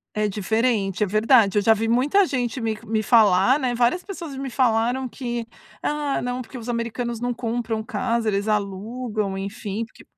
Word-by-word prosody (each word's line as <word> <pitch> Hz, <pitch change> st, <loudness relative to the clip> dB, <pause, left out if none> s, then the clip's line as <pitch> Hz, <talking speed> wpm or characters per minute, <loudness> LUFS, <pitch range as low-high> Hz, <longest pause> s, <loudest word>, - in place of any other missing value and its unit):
É 215 Hz, 0 st, +1 dB
diferente, 210 Hz, -1 st, 0 dB
é -, -, -6 dB
verdade, 215 Hz, 0 st, +4 dB
eu -, -, +4 dB
já 225 Hz, +2 st, +5 dB
vi 220 Hz, +1 st, -1 dB
muita 275 Hz, -, +3 dB
gente 255 Hz, -5 st, -2 dB
me 225 Hz, -2 st, -2 dB
me 220 Hz, 0 st, 0 dB
falar, 215 Hz, +1 st, +5 dB
né, 255 Hz, -4 st, -1 dB
várias 245 Hz, +9 st, +1 dB
pessoas 340 Hz, -8 st, -7 dB
me 270 Hz, 0 st, -4 dB
falaram 245 Hz, +1 st, +1 dB
que: 240 Hz, -2 st, -4 dB, 0.3 s
"Ah, 295 Hz, -2 st, -1 dB
não, 250 Hz, +1 st, -3 dB
porque 255 Hz, +1 st, -9 dB
os 230 Hz, -1 st, -8 dB
americanos 235 Hz, 0 st, -3 dB
não 245 Hz, 0 st, -1 dB
compram 230 Hz, -1 st, -2 dB
casa, 235 Hz, 0 st, -1 dB
eles 205 Hz, 0 st, 0 dB
alugam, 210 Hz, +1 st, -2 dB
enfim, 205 Hz, +2 st, -4 dB
porque" 225 Hz, -, -18 dB
230 Hz, 175 wpm, -23 LUFS, 215-250 Hz, 0.3 s, já